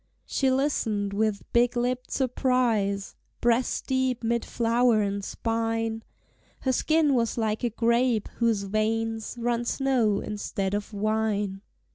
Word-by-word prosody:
She 270 - +1
listened 225 -7 0
with 210 0 0
big 240 +1 +3
lipped 250 +1 -1
surprise, 240 -6 0 0.2
Breast 240 +1 +1
deep 260 -2 0
mid 235 +1 0
flower 235 -1 +2
and 200 0 -2
spine: 225 0 -2 0.6
Her 260 - +1
skin 310 +2 +2
was 235 -2 +1
like 220 0 -1
a 240 - +2
grape, 235 0 +1
whose 230 -4 +1
veins 220 +3 -1
Run 240 0 0
snow 240 -5 +1
instead 200 -2 -3
of 205 +1 -3
wine. 210 -2 -1
230 Hz, 125 wpm, -26 LUFS, 215-245 Hz, 0.6 s, big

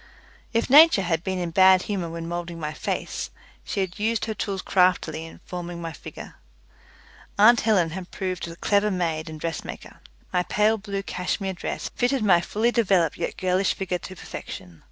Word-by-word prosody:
If 230 0 +1
Nature 295 -6 +7
had 165 -1 0
been 190 -1 -2
in 175 -2 -2
bad 185 +1 +6
humour 185 -5 -3
when 165 0 -6
moulding 170 0 -5
my 155 -1 -4
face, - - -3 0.3
she 200 - -2
had 190 +1 -4
used 220 +1 0
her 220 - -2
tools 195 -2 -3
craftily 175 -4 +2
in - - -14
forming 175 -1 -6
my 165 -1 -5
figure. - - -10 1.0
Aunt 225 +3 +7
Helen 190 -7 +2
had 185 +1 -6
proved 185 -3 -4
a 165 - -8
clever 205 +4 +2
maid 165 -4 -2
and 155 -1 -8
dressmaker. 165 0 -6 0.3
My 180 - +3
pale 210 +4 +2
blue 200 -1 -4
cashmere 190 +1 -2
dress 180 - -5
fitted 245 -1 +1
my 180 -4 +5
fully 220 +7 0
developed 190 -9 +2
yet - - -3
girlish 185 +1 +1
figure 180 -2 -2
to 185 - -9
perfection. 90 - -9
185 Hz, 175 wpm, -25 LUFS, 170-205 Hz, 1.0 s, Nature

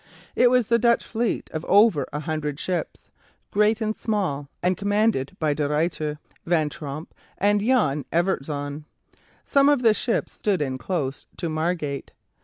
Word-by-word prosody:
It 245 - +5
was 250 -3 +3
the 235 0 +3
Dutch 235 0 +3
fleet 230 0 -2
of 155 0 -4
over 200 - +4
a 150 - -3
hundred 155 -2 -3
ships, 180 -1 -4 0.4
great 210 +2 +2
and 215 0 -1
small, 180 -11 -2
and 180 +1 +2
commanded 200 -5 0
by 155 -2 +1
De 145 0 -1
Ruyter, 150 -1 -1 0.3
Van 160 -3 +1
Tromp, 150 +1 -7 0.2
and 205 +1 +2
Jan 205 - +2
Evertszoon. 150 -4 -1 0.6
Some 280 0 +4
of 285 -4 +2
the 225 -2 +6
ships 225 +3 -1
stood 200 -4 -1
in 130 -3 -2
close 140 0 -3
to 170 - -3
Margate. 155 -3 -2
170 Hz, 155 wpm, -24 LUFS, 150-215 Hz, 0.6 s, the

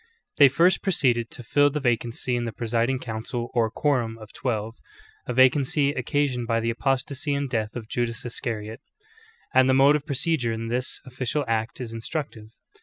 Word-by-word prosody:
They 140 -2 +8
first 170 +7 +3
proceeded 125 - +1
to 125 - -10
fill 145 +5 +3
the 150 +1 -2
vacancy 120 -1 -1
in 120 0 -1
the 115 - -3
presiding 120 +3 0
council 120 0 -5
or 115 -3 +2
"quorum" 120 -4 0
of 110 -2 -13
twelve, 115 -3 -3 0.5
a - - -2
vacancy 135 +2 +4
occasioned 130 -2 -1
by 115 -1 +1
the 115 +1 0
apostasy 135 +4 -1
and 140 0 -1
death 110 -4 -2
of 115 -3 -6
Judas 120 0 -2
Iscariot: 115 -3 -5 0.7
and 130 0 +5
the 130 - +4
mode 140 +2 +6
of 150 0 -3
procedure 140 -4 0
in 115 0 -4
this 125 +2 -2
official 130 +3 -2
act 115 +2 -1
is 120 -3 -6
instructive. 115 -2 -5
125 Hz, 175 wpm, -25 LUFS, 115-140 Hz, 0.7 s, They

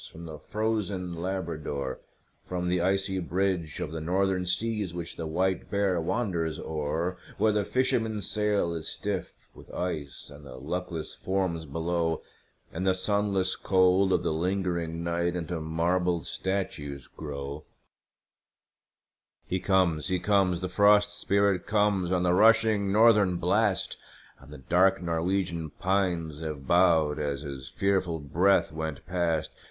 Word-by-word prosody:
from 85 +1 -10
the 80 -2 -8
frozen 105 -4 -2
Labrador, 80 -7 -3 0.4
From 90 -1 -3
the 90 -1 +1
icy 95 +1 +1
bridge 90 -3 -1
of - - -3
the 80 -1 -5
Northern 90 +2 0
seas, 105 -1 -1
which 85 -1 -5
the 80 - -4
white 95 +3 0
bear 100 -4 +1
wanders 85 -5 -1
o'er, 80 +4 -2 0.2
Where 110 +1 +3
the 105 -1 +1
fisherman's 110 -4 0
sail 105 -5 +1
is 80 -2 -4
stiff 100 -4 -3 0.2
with - - -14
ice, 80 -6 -4
and 75 +1 -13
the 65 -3 -10
luckless 80 +4 -4
forms 90 -4 -2
below 80 +2 -1 0.5
In 90 - -3
the 95 -1 +3
sunless 100 -1 0
cold 95 0 +3
of - - +2
the - - 0
lingering 85 -1 -1
night 85 +1 0
into 85 -1 -3
marble 85 +2 0
statues 75 -9 -3
grow 70 0 -7 1.8
He 95 - -1
comes, 90 -6 +2
he 90 - +1
comes, 95 -3 +2
the 90 - -1
Frost 105 +2 +4
Spirit 100 -2 +2
comes 105 -4 +2
on 90 -1 +2
the 90 0 +3
rushing 110 0 +4
Northern 105 -3 +5
blast, 95 +3 +1 0.4
And - - -15
the 75 - -8
dark 90 +8 +3
Norwegian 85 -1 -1
pines 85 -3 -1
have 75 -4 -5
bowed 80 -3 +4
as 70 -2 -2
his 70 -3 -7
fearful 95 -1 0
breath 85 +7 +2
went 80 -2 -5
past. 85 -4 0
90 Hz, 140 wpm, -28 LUFS, 80-95 Hz, 1.8 s, Northern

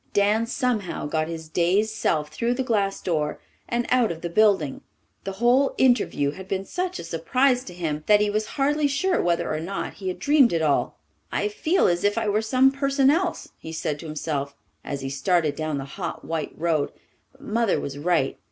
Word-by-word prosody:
Dan 210 +3 +2
somehow 230 -6 -1
got 155 +1 -1
his 165 -1 -6
dazed 185 +7 +1
self 155 -9 0
through 235 +9 -1
the 260 - -1
glass 205 -5 0
door 150 -4 -1 0.3
and 240 0 0
out 245 -5 +3
of 165 -1 -7
the 170 - -4
building. 190 -8 +2 0.4
The 195 - -3
whole 245 +6 +3
interview 240 - +2
had 190 +4 -10
been 195 0 -2
such 365 - -3
a - - -6
surprise 250 +11 +1
to 180 - -9
him 155 -4 -2
that 210 -1 +6
he 210 - +2
was 215 +1 -1
hardly 290 +2 +2
sure 330 +7 +1
whether 170 -2 0
or 155 - -2
not 185 +5 -4
he 195 - -7
had 185 - -2
dreamed 285 - +4
it 165 - +1
all. 145 -2 +1 0.3
"I 420 - 0
feel 380 -4 +1
as 175 -1 +1
if 205 +1 +2
I 225 - 0
were 210 +1 +2
some 255 +4 +4
person 275 0 +2
else," 345 +2 -1
he 160 - -8
said 155 -2 -3
to 165 - -8
himself, 145 -2 -3 0.3
as 140 -1 -4
he 135 - -4
started 155 +2 +1
down 155 -2 -2
the 135 - -4
hot 175 +6 -6
white 160 -2 -3
road. 160 -3 0 0.4
"But 265 - -22
Mother 230 -5 +1
was 140 0 -5
right. 155 -4 +1
195 Hz, 205 wpm, -24 LUFS, 160-245 Hz, 0.4 s, that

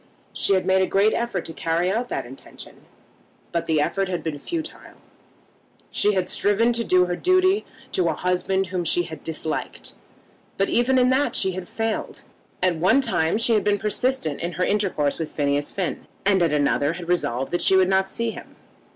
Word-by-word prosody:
She 195 - +2
had 185 - 0
made 190 0 +3
a 190 - +2
great 205 +3 +3
effort 235 0 -2
to 165 - -6
carry 165 +3 0
out 240 +4 -2
that - - -3
intention, 130 +3 -12 0.7
but 170 - -2
the 160 -2 +2
effort 195 +6 0
had 175 -4 -3
been 155 -3 -4
futile. 325 - -6 1.0
She 210 - +2
had 185 -1 0
striven 220 +6 +2
to 235 0 0
do 180 -4 +4
her 175 0 -2
duty 370 - +2 0.3
to 175 -2 +1
a 160 - -1
husband 180 +2 0
whom 180 -1 -3
she 175 +1 +2 0.2
disliked, 160 -1 -4 0.6
but 195 - +1
even 250 +2 +2
in 250 0 +4
that 270 +3 +1
she 190 - +2
had 185 -1 -7
failed. 225 -1 -3 0.4
At 180 -3 +2
one 190 +11 +4
time 210 -8 +1
she 230 +1 +2
had 215 - +2
been 205 0 +2
persistent 210 - -1
in 170 +1 -3
her 180 +3 0
intercourse 185 -9 0
with 160 - -4
Phineas 145 0 0
Finn, 185 -4 -4 0.2
and 195 -2 +4
at 170 -3 +2
another 145 +1 +1
had 170 0 -8
resolved 135 -7 -1
that 175 - 0
she 190 - +4
would 190 -1 +5
not 190 0 +2
see 230 +1 -2
him. - - -11
185 Hz, 195 wpm, -23 LUFS, 165-220 Hz, 1.0 s, would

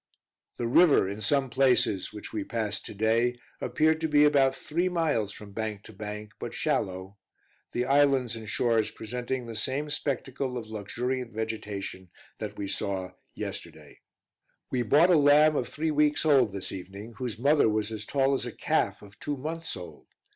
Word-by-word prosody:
The 120 - -2
river, 140 - +5
in 100 +2 -5
some 140 +2 +2
places 125 -7 +2
which 105 -1 -9
we 105 -2 -2
passed 105 -1 -3
to - - -8
day, 115 +4 +2 0.2
appeared 160 +1 +2
to 160 - +1
be 150 -1 +5
about 135 -2 +4
three 175 +4 -1
miles 155 - 0
from 105 0 -10
bank 110 -1 -4
to 110 - -12
bank, 105 +1 -7
but - - -6
shallow; 95 +2 -2 0.5
the 125 - -1
islands 135 -4 +3
and 110 -2 -8
shores 115 -1 +2
presenting 125 +3 -4
the 115 -1 -7
same 135 +7 -1
spectacle 135 -2 -2
of 110 -2 -7
luxuriant 120 +4 -3
vegetation 105 -4 -5 0.3
that - - -5
we 100 - -3
saw 95 -1 -2 0.2
yesterday. - - -7 0.7
We 125 - +1
bought 150 - +5
a - - +7
lamb 150 +1 +6
of 125 - -1
three 160 +1 -1
weeks 150 +1 +2
old, 135 -8 +5
this 95 -1 -3
evening, 100 +4 -8
whose 125 -4 -4
mother 140 0 +4
was 110 0 -1
as 110 -1 -5
tall 135 +4 +1
as 130 -2 -1
a - - -4
calf - - 0
of 100 0 -15
two 145 -1 -3
months 160 +2 -4
old. 90 -1 -11
120 Hz, 175 wpm, -28 LUFS, 105-145 Hz, 0.7 s, a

